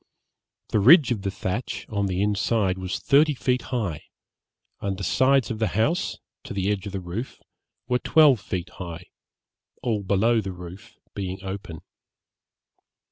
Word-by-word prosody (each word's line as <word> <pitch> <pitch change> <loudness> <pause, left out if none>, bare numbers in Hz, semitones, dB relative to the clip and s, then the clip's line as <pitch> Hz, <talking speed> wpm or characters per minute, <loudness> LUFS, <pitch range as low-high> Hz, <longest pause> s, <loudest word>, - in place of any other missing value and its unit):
The 110 - +2
ridge 135 - +7
of 110 -5 -1
the 100 - -2
thatch, 95 +4 -4
on 100 -2 -1
the 95 +1 0
inside, 100 -2 +1
was 95 0 -3
thirty 150 +1 +3
feet 125 0 0
high, 105 - -2 0.7
and 100 -1 -3
the 100 - -6
sides 130 +1 +3
of 110 - -4
the 110 - +2
house, 155 +11 +1 0.3
to - - -7
the 100 +1 0
edge 100 -1 -3
of - - -5
the 95 - -2
roof, 95 +8 -6 0.5
were 125 0 +1
twelve 150 -5 +5
feet 95 -2 -4
high; 85 -3 -7 0.8
all 115 -4 0
below 110 +4 +2
the 95 -2 -5
roof 90 +6 -11 0.2
being 95 -1 -5
open. 95 -5 -6
100 Hz, 155 wpm, -25 LUFS, 95-120 Hz, 0.8 s, ridge